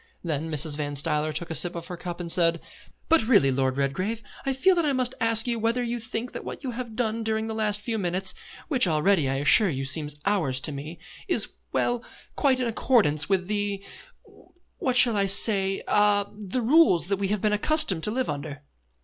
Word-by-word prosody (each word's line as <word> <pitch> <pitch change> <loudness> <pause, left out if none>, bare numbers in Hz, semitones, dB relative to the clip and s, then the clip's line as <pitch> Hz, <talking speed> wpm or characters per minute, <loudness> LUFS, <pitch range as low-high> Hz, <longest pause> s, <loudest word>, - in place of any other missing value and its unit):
Then 160 -2 -3
Mrs. 150 -1 +3
Van 145 -1 -4
Stuyler 150 +2 0
took 165 +2 -4
a - - -1
sip 175 +3 +4
out 170 - -6
of - - -11
her 180 - -6
cup 175 0 -7
and 170 -1 -1
said: 165 -1 +3 0.5
"But 330 0 +4
really, 200 - +4
Lord 130 0 -1
Redgrave, 185 +12 -2 0.2
I - - +2
feel 315 +9 +2
that 345 -2 0
I 290 -2 0
must 255 -1 +1
ask 225 -1 +3
you 235 -2 -2
whether 230 +3 -1
you 240 0 -3
think 235 +1 -5
that - - -8
what - - -8
you 260 - -4
have 240 -2 -7
done 230 -1 -2
during 220 0 -2
the 220 - -5
last 210 -1 0
few 225 0 -3
minutes 185 +1 0 0.3
(which 255 - +3
already, 160 -2 +1
I 135 - -1
assure 150 +9 +4
you, 135 -3 -4
seem 150 +2 0 0.2
hours 165 -11 0
to 145 - 0
me) 150 +4 -8 0.3
is - - 0 0.2
well, 240 -1 -1 0.3
quite 270 -3 +1
in 250 - -1
accordance 215 - +1
with 190 -2 0
the 205 -1 -3 0.9
what 255 -2 -1
shall 240 -2 +6
I 200 -1 +2
say 195 -1 +2
ah, 205 -1 +3
the 210 +4 -4
rules 225 - +3
that 200 - 0
we 200 0 -2
have 205 0 -2
been 210 -1 +1
accustomed 210 - +2
to - - -2
live 255 +4 -2
under?" 145 0 -6
200 Hz, 215 wpm, -25 LUFS, 160-230 Hz, 0.9 s, shall